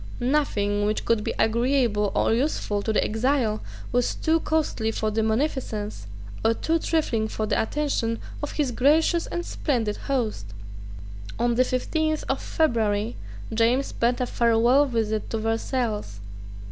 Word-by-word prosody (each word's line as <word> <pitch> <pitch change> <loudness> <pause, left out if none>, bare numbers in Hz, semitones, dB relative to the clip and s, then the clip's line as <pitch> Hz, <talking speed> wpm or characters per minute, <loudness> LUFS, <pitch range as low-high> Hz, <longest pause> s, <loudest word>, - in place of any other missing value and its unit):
Nothing, 210 -7 +1
which 215 - -1
could 230 -2 +2
be - - -3
agreeable 235 -3 +2
or - - +2
useful 230 -5 0
to 220 - -1
the 215 - +2
exile 225 -1 0 0.3
was 245 0 +1
too 320 +1 +2
costly 305 -9 0
for 220 -1 -1
the 220 +1 0
munificence, 220 - -2 0.4
or 225 +1 +3
too 330 +6 0
trifling 250 -10 0
for 215 0 -3
the - - +1
attention, 230 -3 -1 0.2
of 295 - -4
his 290 -5 0
gracious 315 +7 +3
and 345 0 -4
splendid 230 -8 -1
host. 230 - -2 0.9
On 240 0 +1
the 250 +2 +4
fifteenth 310 +5 -1
of 270 - 0
February, 225 -7 0 0.4
James 235 +5 +2
paid 240 +1 0
a 250 - +1
farewell 240 +4 +3
visit 220 -3 -1
to 225 - -2
Versailles. 225 - -2
235 Hz, 145 wpm, -25 LUFS, 220-275 Hz, 0.9 s, the